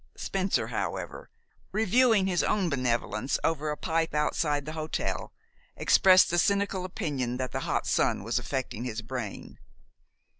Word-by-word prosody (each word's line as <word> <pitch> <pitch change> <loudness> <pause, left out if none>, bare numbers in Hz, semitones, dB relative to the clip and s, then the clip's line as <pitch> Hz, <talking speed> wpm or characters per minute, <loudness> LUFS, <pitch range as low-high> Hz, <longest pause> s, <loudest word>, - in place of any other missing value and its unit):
Spencer, 190 0 -1
however, - - -4 0.4
reviewing 220 -1 +3
his 180 -2 +1
own 195 -5 +1
benevolence 120 -2 0
over 155 -2 0
a 150 - -2
pipe 165 -1 -1
outside 150 -1 0
the 155 - -5
hotel, 155 0 -3 0.4
expressed 185 -2 +5
the 175 - +2
cynical 200 0 +1
opinion 145 - -3
that 130 0 -3
the - - -2
hot - - 0
sun - - +1
was - - 0
affecting 130 -3 -4
his 115 -2 -4
brain. 115 -3 -6
155 Hz, 140 wpm, -28 LUFS, 130-190 Hz, 0.4 s, expressed